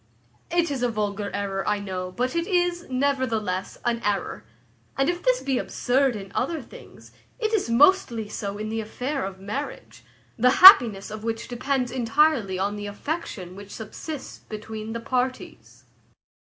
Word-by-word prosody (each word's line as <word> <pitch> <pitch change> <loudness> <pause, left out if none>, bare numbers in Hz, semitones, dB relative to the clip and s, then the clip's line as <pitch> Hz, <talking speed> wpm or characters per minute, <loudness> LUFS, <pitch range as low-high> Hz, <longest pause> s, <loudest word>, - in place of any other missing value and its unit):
It 340 -2 +1
is 270 -3 -3
a 245 - +2
vulgar 205 -2 -2
error, 195 -1 -2
I 210 - +2
know; 185 -2 -5
but 250 - -2
it 335 +1 0
is, 350 -2 0
nevertheless, 255 -8 -1
an 235 -1 0
error. 205 -1 -2 0.5
And 270 +3 +2
if 350 0 -2
this - - +1
be 265 -2 0
absurd 260 0 +1
in 195 -2 -8
other 315 +6 -1
things, 255 - -14 0.3
it 445 -2 -2
is 395 - +1
mostly 235 - +4
so 200 -1 -5
in 215 +1 -4
the 225 0 -2
affair 255 +6 -4
of 190 0 -6
marriage, 210 +9 -6 0.4
the 250 +2 +5
happiness 230 - +9
of 215 0 -7
which 225 0 -3
depends 255 0 -1
entirely 245 -4 +2
on 200 +2 -1
the 205 0 -5
affection 205 - -5
which 200 0 -11
subsists 265 +7 -7
between 220 0 -7
the 230 - -3
parties. 255 +1 -4
235 Hz, 160 wpm, -25 LUFS, 205-280 Hz, 0.5 s, happiness